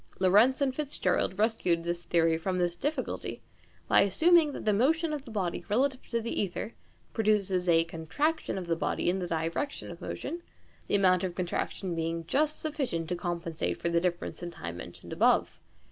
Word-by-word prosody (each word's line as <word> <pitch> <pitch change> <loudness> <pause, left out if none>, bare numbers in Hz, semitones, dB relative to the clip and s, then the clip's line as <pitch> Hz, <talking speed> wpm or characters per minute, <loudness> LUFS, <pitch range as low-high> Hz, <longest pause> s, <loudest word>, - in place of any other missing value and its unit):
Lorentz 210 +9 +4
and 270 -2 +2
FitzGerald 255 -10 0
rescued 205 -6 +1
the 170 0 0
theory 170 -1 +1
from 185 +3 -2
this 175 -1 0
difficulty 290 - -3 0.4
by - - +6
assuming 315 - +5
that - - -7
the 210 - +3
motion 310 +9 +2
of 290 -2 -4
the - - -10
body 195 -6 -2
relative 255 +4 +1
to 235 - 0
the 230 +1 -4
ćther 200 +3 -2 0.4
produces 200 -5 +1
a 165 -1 +5
contraction 170 - -2
of 185 - -4
the 170 -1 0
body 175 - 0
in 190 - -2
the 180 - -3
direction 165 - -2
of - - -11
motion, 345 - -5 0.5
the - - +1
amount 185 -2 +4
of 180 -2 -2
contraction 180 +1 -2
being 165 0 -2
just 300 - +1
sufficient 270 - -2
to 180 - 0
compensate 170 -2 -3
for 170 - 0
the 170 0 +2
differeace 175 -1 -2
in 175 - -4
time 85 - -7
mentioned 85 0 -9
above. - - +3
185 Hz, 180 wpm, -29 LUFS, 170-255 Hz, 0.5 s, by